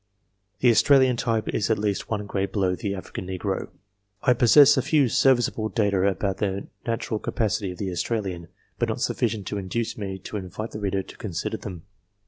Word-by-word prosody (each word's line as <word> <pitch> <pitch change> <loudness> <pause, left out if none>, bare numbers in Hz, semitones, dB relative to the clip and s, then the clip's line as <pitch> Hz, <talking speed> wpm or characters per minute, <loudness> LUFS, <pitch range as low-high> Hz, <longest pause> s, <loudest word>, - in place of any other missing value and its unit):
The 125 - +6
Australian 130 +1 +5
type 115 -2 -1
is 105 - -1
at 110 - +3
least 100 -1 -2
one 105 -2 -2
grade 100 -1 -2
below 95 -3 +1
the 100 +1 -3
African 95 -1 -7
negro. 95 +1 -3 0.6
I 125 - +5
possess 135 +5 +7
a 130 - +2
few 145 0 +3
serviceable 120 -4 +2
data 100 -4 +1
about 95 0 -1
the 100 -1 -2 0.2
natural 115 -1 -2
capacity 105 -4 -1
of - - -13
the 95 -1 -3
Australian, 90 -2 -3 0.3
but - - +1
not - - -3
sufficient 110 -4 -1
to 105 - -3
induce 110 +5 -3
me 95 -2 -4
to 100 +3 -6
invite 100 +4 -6
the 105 - -6
reader 95 -2 -1
to - - -13
consider 100 +2 -3
them. 90 -7 -8
105 Hz, 185 wpm, -25 LUFS, 95-115 Hz, 0.6 s, possess